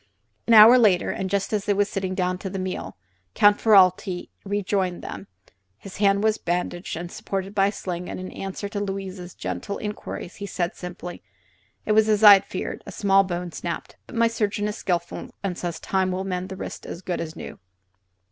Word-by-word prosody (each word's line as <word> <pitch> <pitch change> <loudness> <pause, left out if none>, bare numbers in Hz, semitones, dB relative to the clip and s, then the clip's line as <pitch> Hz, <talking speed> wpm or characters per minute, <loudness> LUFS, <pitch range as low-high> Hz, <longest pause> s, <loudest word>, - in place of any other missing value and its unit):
An 230 - +6
hour 225 +4 +10
later, 200 -6 +3
and 190 - -3
just 200 +2 -1
as 210 -1 0
they 205 - +2
were 205 +1 +3
sitting 190 -2 -3
down 180 -1 -1
to 190 - -5
the 195 - -5
meal, 185 - -4 0.4
Count 205 0 +5
Ferralti 185 -3 +4
rejoined 195 -2 -1
them. 100 -1 -7 0.5
His 195 - -11
hand 200 0 +3
was 220 0 +2
bandaged 175 0 -3
and 170 +1 -6
supported 195 0 -4
by 195 -1 +3
a - - 0
sling, 180 -3 -5
and - - -5
in 185 - -7
answer 195 +1 -5
to 205 - -4
Louise's 195 -3 -5
gentle 90 - -4
inquiries 210 -4 -6
he 200 - -6
said, 175 -1 -2
simply: 180 0 -8 0.6
"It - - 0
was 220 0 +4
as 215 0 +2
I 205 -1 +12
had 195 - +4
feared: 185 - -5
a - - -6
small 195 -1 +3
bone 175 -2 -4
snapped. 170 0 -5
But - - -10
my 230 0 +4
surgeon 210 -2 -1
is 210 - -3
skillful, 175 -4 -3
and 190 -3 -2
says 170 -2 -4
time 190 -1 0
will 185 +1 -2
mend 185 -1 -3
the 190 - -7
wrist - - -7
as 175 - -7
good 175 -1 -2
as 160 -1 -6
new." - - -9
195 Hz, 205 wpm, -24 LUFS, 180-205 Hz, 0.6 s, I